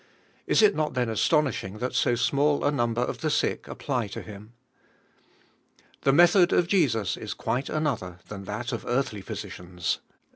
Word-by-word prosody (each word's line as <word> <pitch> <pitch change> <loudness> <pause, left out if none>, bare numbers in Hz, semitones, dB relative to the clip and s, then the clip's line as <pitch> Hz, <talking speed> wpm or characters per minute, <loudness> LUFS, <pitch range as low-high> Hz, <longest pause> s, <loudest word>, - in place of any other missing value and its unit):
Is - - +4
it 205 -1 +6
not 155 -2 -1
then 125 -2 0
astonishing 115 - +1
that 125 +3 -3
so 120 - +2
small 140 +5 +1
a 145 - +3
number 120 -4 0
of - - -2
the 155 - 0
sick 150 - 0
apply 125 -6 -2
to 100 - -7
Him? 105 +2 -11 1.5
The 135 - +3
method 175 +4 +6
of 175 - +3
Jesus 130 - +1
is 110 - -6
quite 125 +4 -2
another 125 - -2
ilia 105 - -5
u 100 - -10
that 110 +5 -4
of 115 - -4
earthly 120 -5 -1
physicians. 90 -1 -4
120 Hz, 170 wpm, -26 LUFS, 105-150 Hz, 1.5 s, it